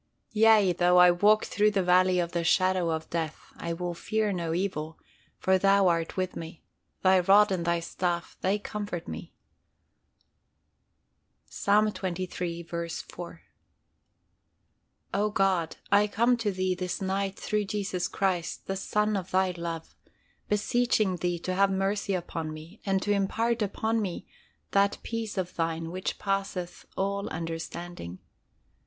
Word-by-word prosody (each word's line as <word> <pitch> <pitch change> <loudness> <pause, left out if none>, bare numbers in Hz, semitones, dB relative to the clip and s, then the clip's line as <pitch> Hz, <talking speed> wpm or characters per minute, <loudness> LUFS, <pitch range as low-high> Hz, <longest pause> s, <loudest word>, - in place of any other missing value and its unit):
"Yea, 215 -4 +5
though 180 +1 +4
I 180 0 +8
walk 210 +5 +4
through 210 +1 +2
the 200 -2 +1
valley 180 +1 +4
of 175 -1 0
the 170 -1 -1
shadow 185 0 +3
of 160 0 -2
death, 160 -2 -4
I 170 0 -3
will 175 +1 -3
fear 215 +4 -1
no 170 -3 -2
evil: 165 -3 -2 0.4
for 190 0 +2
Thou 195 -1 +5
art 165 0 -1
with 185 -1 -1
me; 165 0 -8 0.4
Thy 190 0 +6
rod 200 +3 +5
and 175 -3 -1
Thy 170 0 +1
staff 175 0 -2
they 195 +2 +2
comfort 205 -4 -5
me." 80 - -7 2.1
Ps. - - -9 0.3
xxiii. 180 -2 -4
4. 170 0 -6 1.7
O 205 +2 +2
God, 190 -5 +1 0.2
I 205 +1 +5
come 235 +4 +3
to 225 -3 0
Thee 185 -1 0
this 180 0 -3
night 195 0 -1
through 210 -1 -1
Jesus 195 -3 -2
Christ, 185 -4 -1
the 195 - -2
Son 210 +2 0
of 190 -2 -3
Thy 185 0 +2
love, 170 -2 -6 0.5
beseeching 215 -2 +2
Thee 175 +1 -1
to 185 +2 -3
have 195 +1 +4
mercy 195 +1 0
upon 165 -3 -4
me, 160 +6 -11
and 195 -1 +1
to 205 - 0
impart 225 +4 +1
unto 220 +2 0
me 190 -2 -4 0.5
that 200 0 +3
Peace 225 -3 -4
of 180 -1 -2
Thine 165 0 -2
which 185 +1 -3
passeth 195 -3 -3
all 200 +1 -1
understanding. 165 - -6
185 Hz, 145 wpm, -28 LUFS, 170-200 Hz, 2.1 s, I